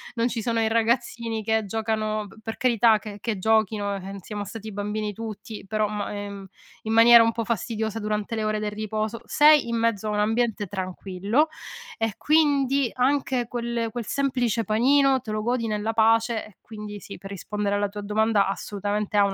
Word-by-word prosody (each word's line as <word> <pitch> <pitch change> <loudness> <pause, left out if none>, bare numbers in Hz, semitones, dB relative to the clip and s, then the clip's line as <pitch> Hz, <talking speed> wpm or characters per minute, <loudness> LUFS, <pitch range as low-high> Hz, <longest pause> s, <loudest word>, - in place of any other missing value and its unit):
non 230 0 +1
ci 235 -2 -3
sono 230 0 0
i 220 - +2
ragazzini 230 0 0
che 220 0 +1
giocano 215 0 -2
p 205 - -17
per 225 - -5
carità 230 -3 +4
che 205 -2 -9
che 225 -4 -2
giochino, 210 -1 +1
ehm, 195 +1 -7
siamo 205 +2 -6
stati 220 +1 -8
bambini 210 +1 -3
tutti, 215 -1 -7
però 215 0 0
ma 205 -1 -4
ehm, 205 0 -5 0.5
in 220 0 -2
maniera 230 0 +8
un 230 - +2
po' 230 0 -3
fastidiosa 220 0 -2
durante 210 +1 -2
le 220 - -2
ore 215 0 0
del 210 -1 -2
riposo 215 +1 -3
sei 300 -3 +5
in 235 - -1
mezzo 225 -2 0
a - - -1
un 210 - 0
ambiente 220 -1 0
tranquillo, 195 - -1 0.5
e 225 -2 -1
quindi, 280 -4 +3
anche 255 -2 +1
quel 235 -1 -2
quel 235 -2 -5
semplice 250 -5 0
panino 265 +5 +3
te 225 -3 -7
lo 215 0 -1
godi 240 -1 0
nella 215 +1 -1
pace. 225 +1 +2
E, 215 - -17
quindi 210 -2 -8
sì, 200 - -9
per 195 +2 -10
rispondere 205 +2 -2
alla 205 0 0
tua 205 +1 -7
domanda, 210 0 +2
assolutamente 205 +1 -2
ha 200 - +6
un 195 - -1
220 Hz, 190 wpm, -25 LUFS, 210-230 Hz, 0.5 s, maniera